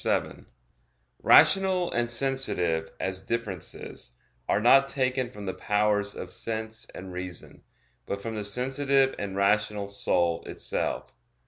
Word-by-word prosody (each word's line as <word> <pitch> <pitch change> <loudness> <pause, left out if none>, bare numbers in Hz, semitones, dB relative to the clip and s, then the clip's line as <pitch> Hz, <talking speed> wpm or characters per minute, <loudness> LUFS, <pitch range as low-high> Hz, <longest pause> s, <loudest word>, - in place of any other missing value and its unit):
7: - - -1 0.7
Rational 190 -2 +5
and 120 0 0
sensitive, 90 -13 0
as 95 0 -3
differences, 95 - -5 0.3
are - - +3
not 135 +5 +6
taken 130 -2 0
from 105 -4 -9
the 95 - -2
powers 105 -1 +1
of - - -7
sense 110 0 -3
and 95 0 -8
reason, 90 -2 -8 0.5
but 100 - -3
from 115 +3 -5
the 105 -1 -3
sensitive 135 +5 +1
and 100 -1 -4
rational 105 +1 +1
soul 85 -4 0
itself. - - -3
105 Hz, 125 wpm, -27 LUFS, 95-130 Hz, 0.7 s, not